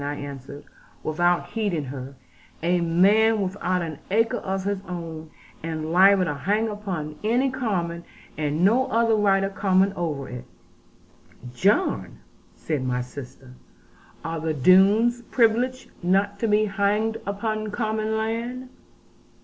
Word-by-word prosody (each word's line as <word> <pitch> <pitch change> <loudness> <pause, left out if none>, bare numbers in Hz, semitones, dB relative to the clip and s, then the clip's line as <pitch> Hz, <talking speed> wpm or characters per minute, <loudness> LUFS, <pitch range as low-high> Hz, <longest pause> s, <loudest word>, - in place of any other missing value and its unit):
I 145 +1 -3
answered, 140 0 -8 0.4
without 175 +3 +1
heeding 205 -9 -1
her; 135 0 -7 0.5
'a 175 +1 +2
man 205 +7 +4
without 185 -2 -1
an 155 -3 -6
acre 225 +3 +2
of 190 0 -3
his 200 -1 -2
own, 165 -3 -6 0.3
and 160 -1 -4
liable 190 +1 +6
to 150 - -1
hang 205 +10 0
upon 180 -8 -5
any 245 +5 +2
common, 180 -10 -2 0.3
and 150 +3 0
no 245 +6 +3
other 230 +1 +2
right 200 -2 +3
of 195 0 -2
common 190 0 +2
over 155 -7 -3
it 125 -1 -8 0.6
' 125 0 -17
'John,' 205 - +1 0.4
said 150 -5 -3
my 125 -1 -1
sister, 125 0 -10 0.7
'are 165 0 -3
the 160 0 -2
Doones 200 - +5
privileged 245 +2 +1
not 195 +3 +1
to 230 - 0
be 210 0 +3
hanged 210 +2 0
upon 215 +1 -2
common 220 0 -1
land?' 235 +3 -3
195 Hz, 135 wpm, -24 LUFS, 160-215 Hz, 0.7 s, liable